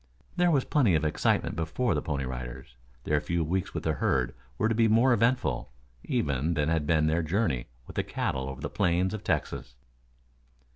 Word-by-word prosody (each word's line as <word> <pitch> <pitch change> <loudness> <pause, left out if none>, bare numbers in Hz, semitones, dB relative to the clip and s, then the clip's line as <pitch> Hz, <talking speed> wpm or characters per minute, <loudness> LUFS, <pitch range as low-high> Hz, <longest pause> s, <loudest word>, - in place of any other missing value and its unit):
There 180 -1 +3
was 140 -6 +2
plenty 120 - +3
of 80 0 +1
excitement 75 - +1
before 85 +8 0
the 75 - 0
Pony 70 -3 -2
Riders. 65 0 -7 0.3
Their 75 +2 +1
few 85 +1 -1
weeks 90 +3 -2
with - - -3
the - - +1
herd 65 -1 0 0.2
were 110 - +2
to 115 - +1
be 115 0 +3
more 115 +4 +5
eventful, 120 - +1 0.3
even, 70 +4 0
than 75 -1 +1
had 80 -3 0
been 80 -1 +3
their 80 +2 +2
journey 80 - 0 0.2
with - - -11
the - - +2
cattle 65 0 -2
over 65 -1 -8
the - - -2
plains 90 +2 +1
of 110 - -5
Texas. - - -2
80 Hz, 190 wpm, -28 LUFS, 70-110 Hz, 0.3 s, more